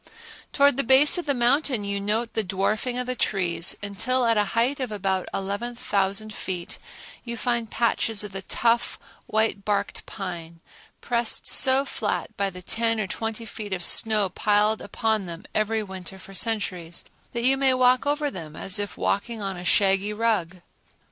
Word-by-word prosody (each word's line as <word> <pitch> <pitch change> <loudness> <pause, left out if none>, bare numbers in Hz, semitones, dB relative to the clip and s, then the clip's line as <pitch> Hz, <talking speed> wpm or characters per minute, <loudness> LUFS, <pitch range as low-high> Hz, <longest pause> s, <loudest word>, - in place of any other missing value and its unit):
Towards 280 -2 +4
the 275 - +2
base 270 +7 +5
of 345 - -6
the 280 - +2
mountain 250 -1 +2
you 200 0 -2
note 220 +3 -1
the 220 - 0
dwarfing 215 +6 -1
of 250 - -1
the 255 - -1
trees, 175 -7 0
until 245 +6 0
at 230 -1 +3
a 210 -1 +3
height 260 +5 +2
of 255 -4 -3
about 190 -2 -1
11,000 200 0 -2
feet 180 -3 -4 0.4
you 235 -1 -5
find 235 -2 -1
patches 225 -2 +1
of 210 - -6
the 195 0 -4
tough, 235 +4 +1 0.3
white 220 -2 +1
barked 205 -1 -2
pine, 170 -4 -6 0.4
pressed 235 -2 0
so 265 +1 +5
flat - - -3
by 200 0 0
the 180 -1 -10
ten 225 +3 0
or 215 - 0
twenty 225 +4 -4
feet 210 -2 -6
of 180 -2 -3
snow 215 +2 +4
piled 210 +3 +2
upon 220 -4 -1
them 170 0 -8
every 215 +1 0
winter 190 -1 -7
for 195 +1 -12
centuries 185 -6 -2 0.3
that 235 -1 -2
you 265 +2 +5
may 270 -1 +3
walk 255 +1 +3
over 290 0 +1
them 160 - -8
as 190 +5 -1
if 205 0 -3
walking 225 +3 -1
on 195 -2 -3
a 175 - -7
shaggy 195 +2 +3
rug. 210 -6 0
215 Hz, 175 wpm, -25 LUFS, 195-240 Hz, 0.4 s, base